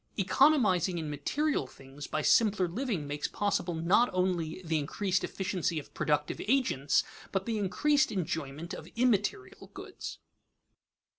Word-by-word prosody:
Economizing 200 - +3
in 155 -2 -3
material 150 - -1
things 135 +2 -11
by 155 - -2
simpler 210 -2 +4
living 200 - -2
makes 145 +1 -3
possible 190 -4 -1
not 180 +9 +3
only 180 -2 -1
the 160 -1 +1
increased 190 +6 -1
efficiency 185 -4 -2
of 150 - -7
productive 150 -1 0
agents 225 - +2 0.3
but 195 -1 -1
the 225 -2 -1
increased 290 +10 +2
enjoyment 160 -4 -4
of - - -8
immaterial 210 - 0
goods. - - -7
185 Hz, 130 wpm, -30 LUFS, 155-215 Hz, 0.3 s, simpler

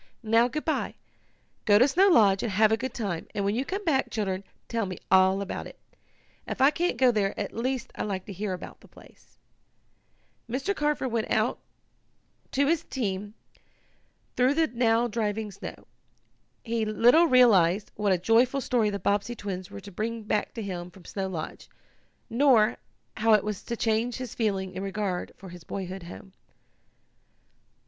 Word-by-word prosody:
"Now, 225 +2 +4
good 305 +4 -5
bye. 315 - -1 0.7
Go 205 -2 +6
to 250 +5 +6
Snow 365 +8 +4
Lodge, 205 - +5
and 230 - -2
have 215 +2 +4
a - - +5
good 260 +3 -4
time, 195 -9 -3
and 200 -1 -1
when 200 - +1
you 245 +4 0
come 390 +8 -4
back, 275 -5 +1
children, 195 -3 -2 0.2
tell 230 -3 -1
me 185 - -6
all 190 +1 +5
about 195 - -5
it. - - -14 0.7
If - - -4
I 270 +2 +6
can't 350 +3 -1
go 255 -2 +5
there 205 -3 -1
at 200 - -4
least 255 +1 -2
I - - -6
like 190 -3 -3
to 200 - -7
hear 195 +1 -3
about 180 - -8
the - - -18
place." - - -19 1.1
Mr. 275 - -1
Carford 295 -5 0
went 225 -1 -1
out 220 +2 +1 0.9
to 280 +1 +3
his 325 +2 +1
team, 205 -6 -4 1.0
through 255 +3 +3
the 325 +1 +3
now 235 -2 +2
driving 215 -1 -2
snow. 195 - -9 0.8
He 230 -1 -1
little 235 +10 +5
realized 210 - +4
what 205 -1 0
a 185 - +4
joyful 235 +8 +3
story 240 -5 +1
the 200 - -2
Bobbsey 205 +4 0
twins 190 -4 -5
were - - -9
to 200 - -11
bring 225 +4 -3
back 210 +2 -1
to 225 - -4
him 180 -3 -5
from 180 -1 -17
Snow 195 -1 -3
Lodge, 165 -4 -6 0.6
nor 235 -3 +4 0.4
how 225 0 +4
it 210 - +4
was 210 -2 -4
to 235 - -4
change 225 +2 0
his 255 -3 -6
feeling 195 -4 -1
in 185 - -5
regard 195 -2 -3
for 190 - -11
his 175 -1 -11
boyhood 190 +1 -5
home. 180 +2 -11
215 Hz, 175 wpm, -27 LUFS, 195-245 Hz, 1.1 s, Go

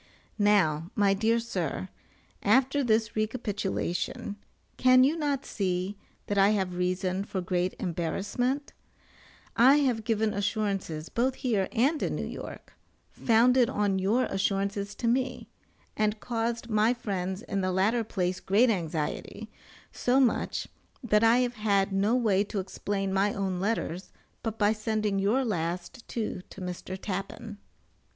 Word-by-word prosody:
Now, 180 -6 +3
my 200 -1 +4
dear 225 +4 +2
sir, 190 -6 -3 0.5
after 270 +2 +3
this 220 -2 +1
recapitulation, 210 -3 -2 0.4
can 255 0 +6
you 285 +5 +3
not 290 -4 -1
see 185 0 -2 0.3
that 205 -1 0
I 195 +1 +6
have 190 -2 -2
reason 185 +1 -1
for 200 -1 -4
great 180 0 -1
embarrassment? 205 - -2 0.8
I 255 +4 +7
have 255 -7 +1
given 220 -1 +1
assurances, 200 -6 -2
both 255 +2 0
here 215 -7 0
and 280 +7 +2
in - - -1
New - - -3
York, - - -8 0.4
founded 240 +1 +4
on 200 -2 0
your 215 +7 +2
assurances 200 0 -1
to 235 - -2
me, 255 +1 0 0.5
and 215 0 0
caused 230 0 -2
my 220 +2 +2
friends 190 -3 -3
in 200 -4 -2
the 185 0 0
latter 210 +6 +2
place 185 -4 -2
great 225 +5 +3
anxiety, 175 +4 -3 0.4
so 250 +2 +2
much 255 -4 +1 0.4
that 210 -2 +3
I 230 +2 +5
have 245 - -4
had 200 -2 +2
no 200 +5 +2
way 210 -6 +3
to 205 - -3
explain 195 +1 -3
my 195 +1 +2
own 190 -2 -2
letters 190 -3 -2 0.3
but 225 -1 -4
by 210 0 +3
sending 215 -2 -1
your 225 +7 +2
last 175 +3 -3
two 215 -5 -3
to - - -11
Mr. 180 +1 -5
Tappan. 200 +2 -5
205 Hz, 140 wpm, -28 LUFS, 190-230 Hz, 0.8 s, I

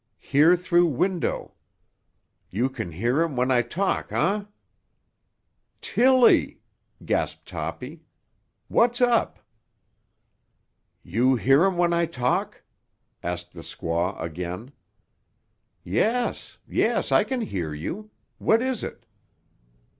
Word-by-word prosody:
Hear 155 +6 +4
through 175 -1 +3
window. 175 +5 -1 1.0
You 120 +7 0
can 115 -9 -6
hear 120 - 0
um 165 -5 -3
when 125 +1 +1
I 125 -1 +4
talk 190 +10 -2
huh?" 200 +6 0 1.3
"Tilly!" 255 0 +4 0.5
gasped - - -2
Toppy. - - -6 0.7
"What's 240 +1 +2
up?" 245 -2 +2 1.7
"You 120 +9 +2
hear 135 +7 +4
um 190 -2 -1
what 175 -1 +2
I 170 0 +1
talk?" 125 -6 -2 0.6
asked 90 0 -5
the 85 - -10
squaw 85 +3 -3
again. 90 - -5 1.1
"Yes, 230 - -1
yes; - - 0
I - - +5
can 260 -2 -3
hear 90 - -3
you. 175 - -6 0.3
What 225 +2 +3
is 260 -3 -2
it?" - - -7
145 Hz, 105 wpm, -25 LUFS, -, 1.7 s, I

